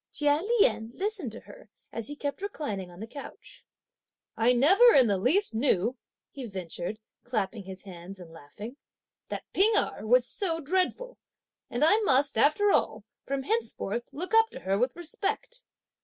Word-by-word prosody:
Chia 295 Hz, 0 st, +2 dB
Lien 420 Hz, -, +2 dB
listened 390 Hz, -, -2 dB
to 235 Hz, -, -9 dB
her, -, -, -15 dB, 0.2 s
as 230 Hz, -1 st, -5 dB
he 290 Hz, -, -6 dB
kept 290 Hz, +3 st, -4 dB
reclining 250 Hz, -, -4 dB
on 175 Hz, 0 st, -14 dB
the -, -, -4 dB
couch. 275 Hz, +5 st, -11 dB, 0.7 s
"I 230 Hz, +2 st, +3 dB
never 380 Hz, -, +6 dB
in 260 Hz, -, +7 dB
the 200 Hz, -4 st, +1 dB
least 315 Hz, -, +2 dB
knew," 230 Hz, -1 st, +2 dB, 0.4 s
he 275 Hz, -, -7 dB
ventured, 185 Hz, -1 st, -5 dB, 0.3 s
clapping 215 Hz, -4 st, -3 dB
his 190 Hz, 0 st, -9 dB
hands 185 Hz, 0 st, -10 dB
and 170 Hz, -2 st, -12 dB
laughing, 205 Hz, -, -10 dB, 0.5 s
"that -, -, -5 dB
P'ing 425 Hz, +4 st, +4 dB
Erh -, -, 0 dB
was -, -, +5 dB
so 335 Hz, -6 st, -2 dB
dreadful; 375 Hz, -, -1 dB, 0.5 s
and 240 Hz, -, -1 dB
I 330 Hz, +7 st, +6 dB
must, 280 Hz, -8 st, +4 dB
after 305 Hz, -, +3 dB
all, 215 Hz, -, +1 dB, 0.2 s
from 275 Hz, 0 st, -2 dB
henceforth 240 Hz, -, -2 dB
look 360 Hz, +8 st, -6 dB
up 450 Hz, 0 st, +5 dB
to -, -, -8 dB
her 190 Hz, +1 st, 0 dB
with 250 Hz, +5 st, 0 dB
respect!" 405 Hz, +8 st, -3 dB
275 Hz, 165 wpm, -28 LUFS, -, 0.7 s, in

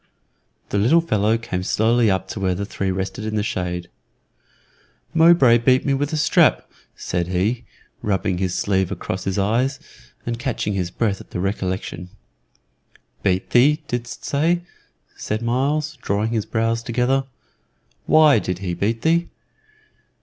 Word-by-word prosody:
The 100 Hz, -, 0 dB
little 125 Hz, +12 st, +4 dB
fellow 110 Hz, -7 st, +1 dB
came 115 Hz, -6 st, -4 dB
slowly 115 Hz, +4 st, +2 dB
up 95 Hz, -1 st, 0 dB
to -, -, -5 dB
where 95 Hz, -2 st, 0 dB
the 100 Hz, +3 st, -3 dB
three 100 Hz, -1 st, -3 dB
rested 95 Hz, +2 st, -3 dB
in 110 Hz, 0 st, -3 dB
the 105 Hz, -, 0 dB
shade. 90 Hz, -3 st, -3 dB, 1.3 s
"Mowbray 160 Hz, -8 st, +6 dB
beat 130 Hz, +2 st, +3 dB
me 140 Hz, -, +2 dB
with 145 Hz, +1 st, -1 dB
a 155 Hz, -, -1 dB
strap," 150 Hz, -, +3 dB, 0.3 s
said 85 Hz, -1 st, -2 dB
he, 95 Hz, +7 st, -1 dB, 0.4 s
rubbing 95 Hz, -3 st, -1 dB
his 95 Hz, -2 st, -1 dB
sleeve 95 Hz, -2 st, 0 dB
across -, -, -4 dB
his 95 Hz, 0 st, -1 dB
eyes, 120 Hz, +8 st, +1 dB, 0.5 s
and 115 Hz, 0 st, -3 dB
catching 125 Hz, -5 st, -2 dB
his 90 Hz, -3 st, -2 dB
breath 100 Hz, 0 st, -1 dB
at -, -, -15 dB
the -, -, -5 dB
recollection. 95 Hz, -2 st, -3 dB, 1.1 s
"Beat 95 Hz, -1 st, 0 dB
thee, 150 Hz, +5 st, +4 dB
didst 120 Hz, -1 st, -5 dB
say?" 165 Hz, +5 st, +1 dB, 0.6 s
said 110 Hz, +2 st, -3 dB
Myles, 145 Hz, +6 st, -1 dB
drawing 105 Hz, +2 st, 0 dB
his 110 Hz, -3 st, -1 dB
brows 115 Hz, 0 st, 0 dB
together. 125 Hz, +3 st, 0 dB, 0.8 s
"Why 155 Hz, -6 st, +6 dB
did 90 Hz, -3 st, -3 dB
he 90 Hz, -2 st, -4 dB
beat 110 Hz, +6 st, -1 dB
thee?" 170 Hz, +1 st, +2 dB
110 Hz, 150 wpm, -21 LUFS, 95-130 Hz, 1.3 s, Mowbray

